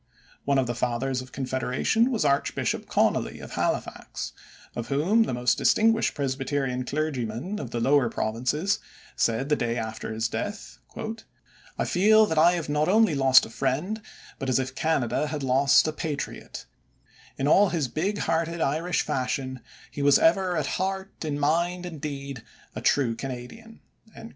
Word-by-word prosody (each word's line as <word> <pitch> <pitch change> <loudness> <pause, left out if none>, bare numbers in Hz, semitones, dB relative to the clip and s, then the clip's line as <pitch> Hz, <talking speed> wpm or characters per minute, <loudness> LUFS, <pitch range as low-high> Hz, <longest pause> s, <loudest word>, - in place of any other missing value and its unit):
One 140 -1 +2
of 130 - +2
the 120 - -2
Fathers 125 +2 -1
of 130 0 -12
Confederation 130 - 0
was 230 -10 0
Archbishop 140 0 0
Connolly, - - +1
of - - -10
Halifax, - - -3 0.4
of 120 -1 -4
whom 165 +11 +2
the 225 - +1
most 125 -1 +1
distinguished 225 +1 +3
Presbyterian 135 -2 -2
clergyman 145 - -3
of 130 - -5
the 120 - -3
Lower 135 0 +3
Provinces 130 - -1 0.4
said 115 +4 +1
the 150 - +4
day 120 -2 -1
after 110 -1 -4
his 110 +1 -1
death: 205 - -5 1.0
"I - - 0
feel 215 +4 +5
that 160 -6 0
I 170 +3 +6
have 170 -3 -3
not 150 +1 +1
only 220 -3 +4
lost 135 -2 +6
a - - -11
friend, 150 - -1 0.4
but 135 - -3
as 130 - +3
if 130 0 -2
Canada 150 -2 0
had 150 -1 -4
lost 135 +3 +4
a 155 - -1
patriot; 150 -2 -5 0.7
in 135 - 0
all 195 +6 +5
his 160 -6 -1
big 190 - -2
hearted 165 0 -1
Irish 160 +4 0
fashion 130 0 -2 0.3
he 145 - -5
was 140 0 +6
ever 190 - +3
at - - 0 0.2
heart, 190 -1 -3
in 145 -2 -2
mind, 170 +5 +1
and 165 -5 -7
deed, 140 -4 -5 0.3
a - - -4
true 125 -5 +2
Canadian." 135 - -8
145 Hz, 160 wpm, -26 LUFS, 130-175 Hz, 1.0 s, I